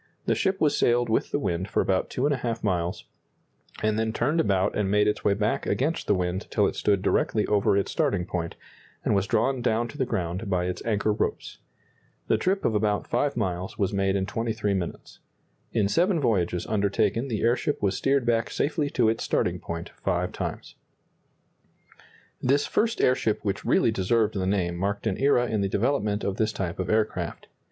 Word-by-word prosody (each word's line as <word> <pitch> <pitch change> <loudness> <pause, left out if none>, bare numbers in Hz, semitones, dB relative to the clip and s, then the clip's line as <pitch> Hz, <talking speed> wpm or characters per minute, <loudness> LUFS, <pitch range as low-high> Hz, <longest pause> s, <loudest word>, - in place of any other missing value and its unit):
The - - +2
ship 190 0 0
was 145 -2 +3
sailed 120 -2 +2
with 110 - +1
the - - 0
wind 95 -7 -2
for - - 0
about 95 -1 +1
2½ 125 -4 -1
miles, 90 -4 -1 0.8
and 110 0 +1
then 110 0 0
turned 140 +9 0
about 100 -9 +1
and 105 -2 0
made 105 +1 +3
its 105 - -1
way 100 - +3
back 105 +1 -1
against 155 +6 -1
the 105 - +3
wind 90 +2 -2
till 105 - +2
it - - -1
stood 100 -2 +1
directly 105 -2 +1
over 100 -1 +2
its 100 - 0
starting 90 -3 0
point, 85 -2 -4 0.5
and - - +2
was 100 -1 +1
drawn 125 +3 +1
down 120 0 +1
to 145 - -11
the 130 - +2
ground 95 0 -3
by 90 -2 +1
its 90 - -4
anchor 105 -1 +1
ropes. - - -3 0.7
The - - +3
trip 195 +2 0
of 115 - +2
about 105 -1 +1
5 145 -4 0
miles 95 -4 -2
was 100 -1 0
made 95 0 +1
in 95 -1 0
23 110 -1 -1
minutes. 90 -3 -5 0.5
In 105 -3 +2
seven 175 - +2
voyages 90 - 0
undertaken 105 +3 0
the 110 -5 -2
airship 125 +6 +1
was 100 -1 0
steered 135 -2 +1
back 115 -1 +1
safely 150 0 -1
to 120 -5 +2
its 110 +1 0
starting - - 0
point 85 0 -6
five - - 0
times. - - -5 1.7
This 140 +3 +2
first 230 +1 0
airship 115 -5 +1
which 100 0 -1
really - - +3
deserved 110 +2 +1
the 95 -2 -1
name 90 -3 0
marked 100 +4 -2
an 105 -4 -1
era 135 -3 +3
in 110 -4 -1
the 100 - 0
development 105 -1 0
of 100 -1 -2
this 110 -1 +1
type 90 -3 -4
of 90 -1 -2
aircraft. 110 +1 -1
105 Hz, 190 wpm, -26 LUFS, 95-120 Hz, 1.7 s, was